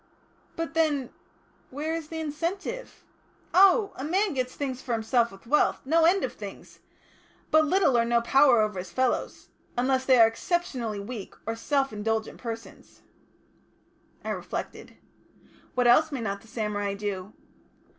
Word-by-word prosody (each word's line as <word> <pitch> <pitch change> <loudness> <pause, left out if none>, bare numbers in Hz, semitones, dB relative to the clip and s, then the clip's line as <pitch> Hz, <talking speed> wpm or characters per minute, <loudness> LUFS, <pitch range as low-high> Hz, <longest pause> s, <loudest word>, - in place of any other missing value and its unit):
"But, 330 0 -4
then 300 -6 +1 0.6
where 300 +4 -3
is 325 -2 -4
the 320 +1 -6
incentive 340 +10 -4 0.3
?" - - -35
"Oh! 395 +2 +5
a 260 - -6
man 375 +5 +1
gets 255 -2 -2
things 260 -3 -4
for 245 - -3
himself 230 +1 +1
with 195 +2 -15
wealth 295 +6 +2
no 325 +4 +4
end 370 +3 +4
of - - -2
things. - - -10 0.7
But 315 0 +5
little 360 -6 +3
or 235 - +4
no 235 0 +2
power 255 0 +5
over 210 -3 -1
his 180 0 -6
fellows 255 +5 -1 0.3
unless 260 +1 +1
they 260 -1 +5
are 225 - +9
exceptionally 235 - -2
weak 210 0 -7
or 225 - -2
self 275 +1 0
indulgent 220 +1 -2
persons." 230 -1 -8 1.2
I - - -2
reflected. - - -6 0.8
"What 250 -1 +2
else 310 +6 +5
may 270 -4 -3
not 200 -2 -3
the 225 - -18
samurai 205 -3 -2
do?" 200 -1 -5
255 Hz, 155 wpm, -27 LUFS, 225-315 Hz, 1.2 s, are